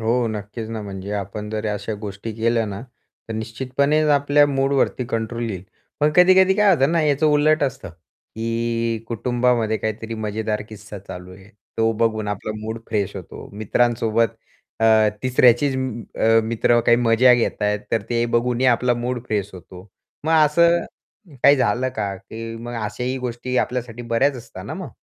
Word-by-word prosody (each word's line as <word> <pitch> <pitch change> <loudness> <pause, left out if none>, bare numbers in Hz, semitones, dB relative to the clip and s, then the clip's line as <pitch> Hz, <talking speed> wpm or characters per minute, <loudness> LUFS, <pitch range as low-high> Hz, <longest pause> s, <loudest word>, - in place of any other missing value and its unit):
हो. 115 +2 +1
नक्कीच 110 +1 -6
ना, 110 -2 -4
म्हणजे 100 0 -7
आपण 105 +1 -4
जर 110 0 -3
अशा 105 +1 -4
गोष्टी 105 +1 -6
केल्या 115 0 +1
ना, 100 -1 -6 0.5
तर - - -4
निश्चितपणेच 130 +7 0
आपल्या 145 0 +4
मूडवरती 135 -2 0
कंट्रोल 115 -1 -3
येईल. 95 -2 -6 0.4
पण 150 +1 +4
कधी-कधी 185 +1 +6
काय 210 -1 +4
होतं 145 +1 +2
ना, 170 - +3
याचं 150 +1 +2
उलट 150 +1 +3
असतं, 130 -7 -2
की 115 +6 -4
कुटुंबामध्ये 120 -1 +1
काहीतरी 110 +1 -4
मजेदार 110 0 -3
किस्सा 105 -1 -10
चालू 90 -1 -10
आहे, 95 +1 -16 0.3
तो 115 0 +3
बघून 110 -1 0
आपला 105 +1 -4
मूड 110 +1 -5
फ्रेश 105 -4 -1
होतो. - - -9
मित्रांसोबत 115 +1 +1 0.4
अ, 110 - +3 0.4
तिसऱ्याचीच 130 +1 +4
अ, 115 -3 +1
मित्र 115 +1 +2
काही 120 0 +6
मजा 120 +1 +5
घेत 115 -3 -1
आहेत, 105 0 +1
तर 115 - +1
ते 120 0 +1
बघूनही 125 +2 +1
आपला 125 0 +3
मूड 120 +1 -3
फ्रेश 105 -2 -2
होतो. 90 0 -12 0.4
मग 160 - +1
असं 170 +3 +3 0.6
काही 140 0 +7
झालं 125 +1 +1
का, 100 -2 -2
की 115 +4 -8
मग 120 +1 -7
अशाही 125 +4 -3
गोष्टी 125 +1 -4
आपल्यासाठी 120 -1 -3
बऱ्याच 120 +4 +1
असतात 120 - -10
ना - - -5
मग? - - -6
115 Hz, 160 wpm, -21 LUFS, 110-130 Hz, 0.6 s, काही